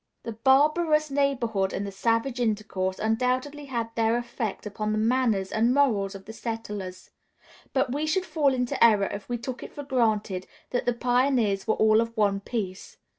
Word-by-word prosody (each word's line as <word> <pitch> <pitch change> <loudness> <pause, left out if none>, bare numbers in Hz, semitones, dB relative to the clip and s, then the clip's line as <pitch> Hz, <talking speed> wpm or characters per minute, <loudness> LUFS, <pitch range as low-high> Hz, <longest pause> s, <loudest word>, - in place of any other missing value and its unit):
] - - -52
The 230 - -4
"barbarous 305 +6 +3
neighborhood" 240 -9 0
and 200 - -2
the 200 - -5
"savage 230 +5 0
intercourse" 205 -5 -1
undoubtedly 255 +6 -1
had 230 -4 -3
their 225 +1 +2
effect 235 -4 -4
upon 215 +1 -3
the - - 0
manners 220 -4 +1
and 230 +4 +2
morals 215 -9 +2
of 195 - -10
the 220 - -9
settlers; 210 -5 -6 0.6
but 265 -2 +1
we 300 +2 -1
should 370 +4 +1
fall 300 -6 +2
into 250 -2 0
error 210 -4 +5
if 200 +3 -7
we 240 - -1
took 245 +2 -6
it - - -8
for 290 - -6
granted 220 -8 0 0.2
that 245 - -1
the 245 - +3
pioneers 245 -4 +1
were 220 - +2
all 220 0 +4
of 230 0 -4
one 200 -2 +2
piece. 205 - -5
230 Hz, 180 wpm, -26 LUFS, 210-260 Hz, 0.6 s, error